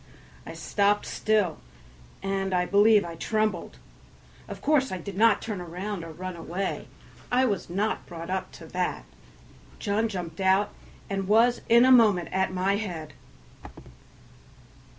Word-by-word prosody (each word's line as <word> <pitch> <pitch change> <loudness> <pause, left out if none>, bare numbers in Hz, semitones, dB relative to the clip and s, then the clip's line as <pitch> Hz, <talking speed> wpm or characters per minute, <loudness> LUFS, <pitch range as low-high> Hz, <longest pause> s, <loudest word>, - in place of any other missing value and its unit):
I - - -7
stopped 205 0 +1
still, 210 -6 0 0.6
and 195 -1 -1
I 180 0 +2
believe 205 +1 +5
I 170 - -6
trembled; 215 +1 -2 0.7
of - - -7
course 285 -3 +2
I 185 - -2
did 185 +2 -8
not 220 +1 +4
turn 210 -5 -4
round 180 +2 -5
or 165 - -8
run 185 +3 -6
away; 180 +3 -4 0.4
I 255 +1 +4
was 205 -8 -2
not 200 +5 -2
brought 170 0 -7
up 190 0 -3
to - - -11
that. - - -3 0.7
John 215 +1 0
jumped 175 -3 -5
out 190 +2 +3 0.4
and 195 -1 -3
was 230 +4 +4
in 235 +2 +7
a 260 - +5
moment 215 -8 +5
at 190 0 0
my 190 +2 +1
head. 175 -8 -5
195 Hz, 145 wpm, -26 LUFS, 180-215 Hz, 0.7 s, in